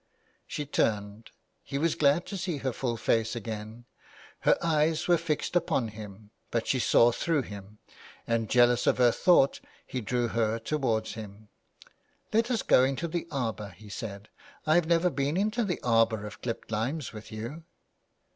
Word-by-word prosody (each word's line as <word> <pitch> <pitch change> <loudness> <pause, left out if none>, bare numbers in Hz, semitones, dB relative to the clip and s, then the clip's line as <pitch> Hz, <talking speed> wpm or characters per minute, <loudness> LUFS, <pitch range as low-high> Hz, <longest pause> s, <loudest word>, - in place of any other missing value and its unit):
She 150 - -4
turned; 105 -5 -1 0.3
he 140 - -5
was 160 +3 +1
glad 150 +4 +3
to 200 - -6
see 180 -4 -2
her 130 -2 -2
full 120 -1 -2
face 115 0 +1
again. 110 +1 -6 0.5
Her - - +3
eyes 160 -1 +1
were 175 - +6
fixed 165 +1 -2
upon 145 -9 +1
him, 105 -1 -11 0.2
but 115 -1 -1
she 130 - +1
saw 120 0 +5
through 155 +3 0
him, 100 -1 -10 0.5
and 115 -1 0
jealous 120 0 +4
of - - +4
her 125 -2 +5
thought 140 -1 +4 0.3
he 130 - -4
drew 120 +2 -1
her 115 -1 0
towards 115 -2 -1
him. 105 -1 -10 0.4
" - - -31
Let 225 +2 +3
us 240 -3 0
go 125 - +5
into 135 +5 0
the 170 +1 -3
arbour,'' 110 - -3
he 105 +1 -13
said. 100 -2 -6 0.2
'^ - - -22 0.2
I 155 - +3
have 170 -1 +3
never 170 +1 +3
been 140 +3 -1
into 215 +4 +1
the 185 -5 -2
arbour 115 -3 +2
of 105 - -9
clipped 115 -2 -5
limes 120 +7 -2
with 110 0 -10
you." 115 +10 -6
120 Hz, 175 wpm, -28 LUFS, 110-155 Hz, 0.5 s, were